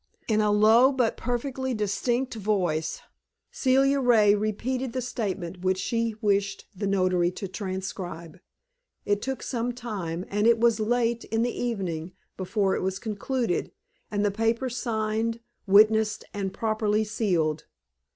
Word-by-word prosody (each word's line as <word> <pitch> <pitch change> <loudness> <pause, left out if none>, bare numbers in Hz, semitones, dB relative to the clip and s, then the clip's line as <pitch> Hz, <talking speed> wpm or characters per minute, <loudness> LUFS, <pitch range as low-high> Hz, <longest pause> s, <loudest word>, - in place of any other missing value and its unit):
In 215 -1 +2
a 210 - +2
low 220 +5 +6
but 250 -4 +1
perfectly 260 +1 -2
distinct 235 +5 -1
voice, 190 -7 -1 0.5
Celia 270 +1 +3
Ray 225 -5 +5
repeated 230 +5 -2
the 260 - -1
statement 195 -7 -4
which 185 0 +1
she 230 +2 -1
wished 200 -1 0
the 200 +2 -2
notary 185 -3 +2
to 195 - -5
transcribe. 185 -3 -6 0.7
It 205 0 +1
took 265 +1 -4
some 245 -1 -2
time, 195 -8 -5
and 210 +2 +1
it 235 -1 +5
was 230 -1 +3
late 235 +1 +1
in 225 +1 0
the 245 - -1
evening 185 -8 -3 0.2
before 195 +1 0
it - - -2
was 190 0 -1
concluded, 220 -1 -2 0.4
and 205 0 0
the 205 - +2
paper 225 +4 0
signed, 225 -1 -1 0.3
witnessed, 215 +2 +4
and 195 -2 -3
properly 215 0 0
sealed. 180 -8 0
215 Hz, 140 wpm, -26 LUFS, 195-235 Hz, 0.7 s, low